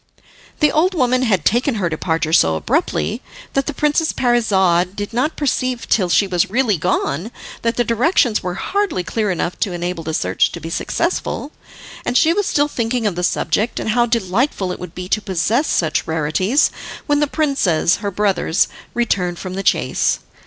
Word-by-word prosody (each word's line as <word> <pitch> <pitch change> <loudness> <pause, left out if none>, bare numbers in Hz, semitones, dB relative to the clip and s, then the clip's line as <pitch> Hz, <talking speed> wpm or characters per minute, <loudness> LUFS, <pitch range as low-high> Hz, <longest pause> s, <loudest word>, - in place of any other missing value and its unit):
The 300 - +5
old 360 +5 +2
woman 255 -4 +2
had 195 -10 +1
taken 245 +4 +2
her 195 -5 0
departure 160 -1 -1
so 80 - +4
abruptly 285 - -1 0.3
that 275 - 0
the - - 0
Princess 300 +2 +1
Parizade 190 -7 +2
did 205 +2 -5
not 255 +7 0
perceive 255 -4 -1
till 185 -5 +2
she 200 - +4
was 180 -3 0
really 230 -1 +2
gone 175 +1 -1 0.3
that 230 0 -1
the 240 - +3
directions 235 - +2
were 180 0 -4
hardly 400 - -1
clear 210 +3 -1
enough 180 -1 -2
to 195 - -1
enable 175 -1 -3
the 160 0 -3
search 90 - +1
to - - -5
be 165 +2 -7
successful. 330 - -2 0.5
And 245 - +1
she 325 +1 +4
was 410 +1 0
still 290 0 +2
thinking 235 -3 -2
of 205 - +1
the 180 - -2
subject, 210 +5 0
and - - -3
how 240 +1 +2
delightful 220 -2 0
it - - -6
would 180 -2 -9
be 180 0 -6
to 215 - 0
possess 205 - 0
such 160 -3 0
rarities, 165 - +1 0.3
when 290 -1 +2
the 295 - +2
princes, 270 - +1
her 205 -1 -3
brothers, 195 -4 +1 0.3
returned 185 -7 0
from 185 +1 -6
the 195 - -3
chase. - - +1
210 Hz, 180 wpm, -19 LUFS, 180-255 Hz, 0.5 s, The